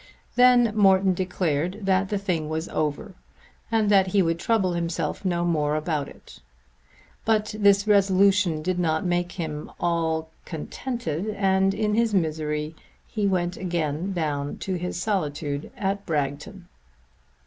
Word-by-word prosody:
Then 245 -3 +5
Morton 190 -2 +4
declared 180 0 -1
that 190 0 +2
the 205 - 0
thing 175 -6 -2
was 160 +1 -3
over 155 +5 -2 0.6
and 220 -2 +2
that 195 -2 +5
he 195 +1 +3
would 165 0 0
trouble 195 -3 +1
himself 170 -2 -2
no 175 -2 0
more 150 -3 +1
about 155 -2 -1
it. - - -14 0.8
But 215 -1 +1
this 200 0 +4
resolution 195 -4 +3
did 185 +1 -1
not 160 0 0
make 175 0 0
him 155 -4 -5
at - - -19
all 160 -2 0
contented, 180 - -4
and 195 -1 +2
in 210 0 0
his 225 -1 +2
misery 155 -2 -1 0.3
he 210 -2 -1
went 180 -2 0
again 170 0 -2
down 145 -5 -2
to 190 - -4
his 180 0 -3
solitude 150 -7 -2
at 200 0 -2
Bragton. 150 +4 -3
180 Hz, 140 wpm, -25 LUFS, 160-200 Hz, 0.8 s, Then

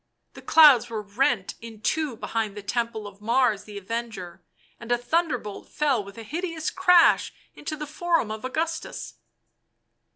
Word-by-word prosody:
The - - -12
clouds 295 -8 +7
were 220 -2 -4
rent 205 -1 0
in 225 -2 -10
two 300 +3 -1
behind 215 -3 -3
the 205 - -7
temple 230 -1 -2
of 200 0 -11
Mars 230 -2 +2
the 210 -1 -9
Avenger, 200 -4 -5 0.4
and 235 0 -7
a 240 - +4
thunder 315 +3 0
bolt 210 -3 -9
fell 275 -8 +1
with 200 +1 -12
a 225 - -7
hideous 330 - -3
crash 360 -3 +5 0.2
into 310 - -5
the 300 0 -5
Forum 325 -5 0
of 215 0 -6
Augustus. 320 +5 -4
235 Hz, 160 wpm, -25 LUFS, 210-310 Hz, 0.4 s, clouds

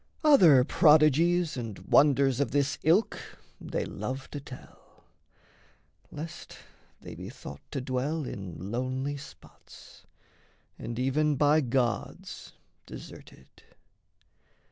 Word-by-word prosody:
Other 175 - +7
prodigies 160 +2 +4
And 115 -5 -6
wonders 140 -3 +3
of 140 - +1
this 140 -1 0
ilk 175 +8 +2 0.4
they - - -3
love 130 +6 -6
to 145 - -5
tell, 135 -2 -14 1.1
Lest 155 +2 -8 0.4
they - - -9
be - - -8
thought - - -10
to 135 - -4
dwell 135 +4 -2
in 95 -3 -7
lonely 130 +4 -2
spots 140 - -15 0.7
And 115 0 -6
even 145 +4 +1
by 150 +3 +3
gods 125 -2 -3 0.3
deserted. 65 - -13
140 Hz, 100 wpm, -28 LUFS, 125-155 Hz, 1.1 s, Other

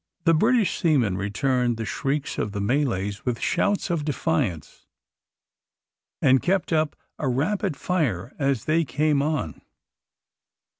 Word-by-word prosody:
The 165 0 +4
British 215 +3 +2
seamen 130 - +2
returned 120 +5 0
the 110 - -3
shrieks 140 +5 -2
of 105 - -2
the 100 - -3
Malays 105 -4 -1
with 125 -2 -2
shouts 200 -2 0
of 165 -3 0
defiance, 145 - -2 1.4
and 130 0 +5
kept 190 -2 0
up 155 -1 +1 0.2
a 150 - -1
rapid 145 +4 0
fire 130 - -1
as 135 -5 0
they 165 +2 +2
came 150 0 +1
on. 145 - -2
140 Hz, 130 wpm, -24 LUFS, 115-160 Hz, 1.4 s, and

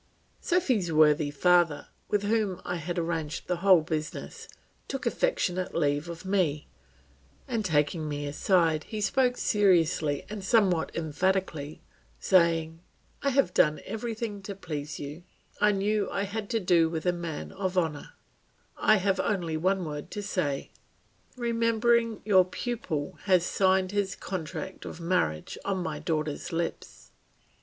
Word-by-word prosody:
Sophy's 255 - +1
worthy 155 -1 +4
father, 170 +1 +3 0.2
with 205 -1 0
whom 205 -3 0
I 180 - -2
had 175 +2 -4
arranged 165 -2 -2
the 180 - -1
whole 185 -1 +6
business, 155 -1 -5 0.4
took 270 - -4
affectionate 185 - 0
leave 145 +3 0
of 170 +1 -8
me, 180 -7 0 0.8
and 230 -4 -1
taking 155 -2 +1
me 145 0 -3
aside, 160 +1 +2
he 215 - -5
spoke 250 +4 +2
seriously 170 -8 +2
and 210 -2 -6
somewhat 190 -6 +3
emphatically, 160 -1 -1 0.4
saying, 165 -3 +2 0.4
"I 280 - +1
have 275 +1 +2
done 150 0 +3
everything 220 -1 -4
to 195 +1 -6
please 150 -5 -5
you; 145 +4 -7 0.4
I 210 0 +5
knew 205 +1 0
I 200 - -1
had 205 +1 -4
to 230 - +1
do 175 -4 +3
with 160 0 -4
a 180 - +3
man 170 -3 -5
of 185 -1 -3
honour; 160 -5 -1 0.6
I 215 - +5
have 195 -1 +1
only 175 -6 -1
one 185 +3 +1
word 150 -1 -6
to 205 - -3
say. 150 -9 -2 0.7
Remembering 230 -1 +1
your 190 -4 +5
pupil 185 - -4
has 185 -3 +4
signed 190 0 +2
his 200 -1 -1
contract 185 +1 -6
of - - -8
marriage 165 - -1
on 195 -1 -1
my - - -4
daughter's 155 0 -2
lips." 170 0 -4
180 Hz, 140 wpm, -28 LUFS, 160-205 Hz, 0.8 s, whole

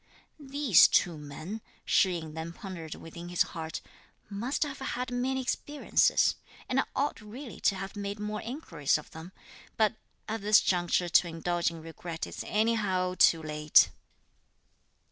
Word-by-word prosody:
"These 280 - +5
two 175 -3 +2
men," 155 +8 -7 0.2
Shih 190 -2 +3
yin 160 -2 -8
then 160 +1 -5
pondered 170 -5 -7
within 170 +1 -9
his 175 - +3
heart, 160 -2 -5 0.5
"must 235 +10 -1
have 285 -2 -6
had 250 -1 -3
many 255 +2 0
experiences, 290 +3 +2 0.3
and 255 - +1
I - - +2
ought 280 -3 -1
really 230 +5 -9
to 200 - +2
have 195 +2 -6
made 200 0 -4
more 210 0 -3
inquiries 205 - -1
of 150 - -11
them; 160 +3 -10 0.5
but 215 -2 +3 0.3
at 220 0 -3
this 210 +1 +6
juncture 175 -1 +1
to 175 - +5
indulge 170 +1 -1
in 165 -1 -10
regret 165 0 -6
is - - -7
anyhow 205 -4 +1
too 165 -1 +5
late." 150 0 +4
190 Hz, 150 wpm, -29 LUFS, 165-230 Hz, 0.5 s, this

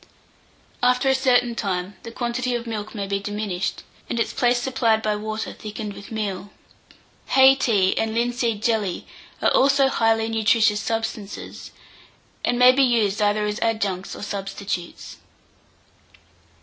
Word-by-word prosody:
After 250 +2 +3
a - - +5
certain 250 -2 +2
time, 190 -3 -3
the 230 - -9
quantity 245 +1 -2
of 240 0 -4
milk 215 -1 -5
may 200 -2 -3
be 200 0 -2
diminished, 205 -2 -3 0.3
and 235 - -2
its 230 - -1
place 245 0 +2
supplied 240 -4 +1
by 215 -1 0
water 215 +1 -4
thickened 210 -1 -7
with 200 - -12
meal. 205 -3 -4 0.8
Hay 265 0 +7
tea 210 -8 +2
and 220 0 -1
linseed 235 -2 -1
jelly 215 -6 0 0.4
are - - +4
also 275 0 +4
highly 225 -3 +1
nutritious 220 -1 +2
substances, 225 -3 -5 0.7
and 245 - +1
may 250 +1 +8
be 270 +2 +2
used 225 -6 +2
either 210 0 +2
as 210 0 -3
adjuncts 205 -5 -1
or - - -8
substitutes. 195 -3 -5
220 Hz, 140 wpm, -23 LUFS, 205-240 Hz, 0.8 s, may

